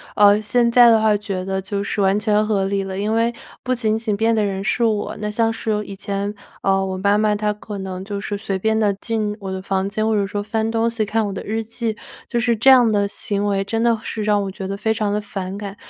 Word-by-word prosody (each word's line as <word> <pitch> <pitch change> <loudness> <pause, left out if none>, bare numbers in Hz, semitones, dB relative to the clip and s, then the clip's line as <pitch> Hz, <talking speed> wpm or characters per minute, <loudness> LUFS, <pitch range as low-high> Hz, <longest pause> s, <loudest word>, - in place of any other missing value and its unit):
呃， 205 0 +6
现 235 +2 +2
在 240 0 +7
的 225 -1 +5
话 215 -1 +3
觉 200 -3 -4
得 190 0 -2
就 200 +1 -3
是 205 - -3
完 195 0 +3
全 210 0 +2
合 200 -3 +1
理 195 0 -1
了。 190 0 -5
因 205 +2 -1
为 230 +1 +1 0.3
不 255 - 0
仅 220 -3 0
仅 220 -2 -1
变 225 +2 +2
的 215 -2 +2
人 195 -1 -3
是 235 +4 0
我， 215 -2 0
那 210 0 -2
像 225 +1 +1
是 225 0 -3
有 210 0 0
以 200 - -8
前， 200 0 -3 0.3
呃， 195 0 +2
我 190 0 -3
妈 200 +2 +2
妈 210 0 +2
她 210 0 0
可 210 -1 -8
能 190 -1 -6
就 200 -1 -4
是 205 0 -3
随 195 -1 -3
便 220 +2 +1
地 205 -2 +2
进 215 -3 -2
我 190 -1 -5
的 190 0 -4
房 195 0 -1
间， 215 +1 -1
或 220 - +2
者 200 -1 +1
说 205 +1 -3
翻 220 +1 -1
东 230 0 +1
西、 230 -1 -1
看 215 +1 0
我 200 - -3
的 190 - -5
日 225 +2 -2
记， 225 0 -4 0.3
就 240 - 0
是 235 0 +2
这 235 +5 +4
样 250 -3 +7
的 205 -1 +2
行 200 0 -2
为 195 -1 +1
真 225 +3 -2
的 230 -2 +2
是 220 - -4
让 210 -1 +2
我 195 - -4
觉 190 -1 -6
得 195 +1 -4
非 220 +2 0
常 210 -2 -1
地 210 - 0
反 195 -2 -5
感。 200 -1 -6
210 Hz, 290 characters per minute, -21 LUFS, 200-220 Hz, 0.3 s, 在